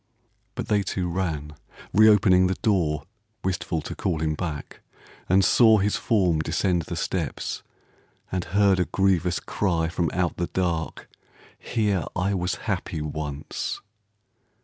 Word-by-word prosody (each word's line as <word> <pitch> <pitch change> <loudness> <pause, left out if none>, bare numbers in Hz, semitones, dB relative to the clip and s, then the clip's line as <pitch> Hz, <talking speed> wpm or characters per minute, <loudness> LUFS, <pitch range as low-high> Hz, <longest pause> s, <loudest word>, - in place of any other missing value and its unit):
But - - -4
they 105 -1 +2
two 95 -1 -2
ran, 80 -5 -2 0.4
re 110 +3 +7
opening 95 -3 +5
the 95 - 0
door 85 -9 +1 0.4
(Wistful 90 -4 -2
to - - -5
call 85 -4 -1
him 80 -1 0
back), 75 -3 -5 0.5
and 95 +1 +5
saw 110 -3 +6
his 105 +1 +1
form 90 -8 +2
Descend 85 +3 +1
the - - -4
steps, - - -3 0.7
and 90 -1 -2
heard 100 -2 +3
a 90 - +2
grievous 90 -3 +1
cry 85 -5 0
From 85 -2 0
out 90 -1 -1
the 85 - -1
dark: 85 -3 -2 0.5
"Here 105 -7 0
I 100 +2 0
was 90 -3 -1
happy - - -2
once!" 75 -1 -4
90 Hz, 140 wpm, -25 LUFS, 80-95 Hz, 0.7 s, re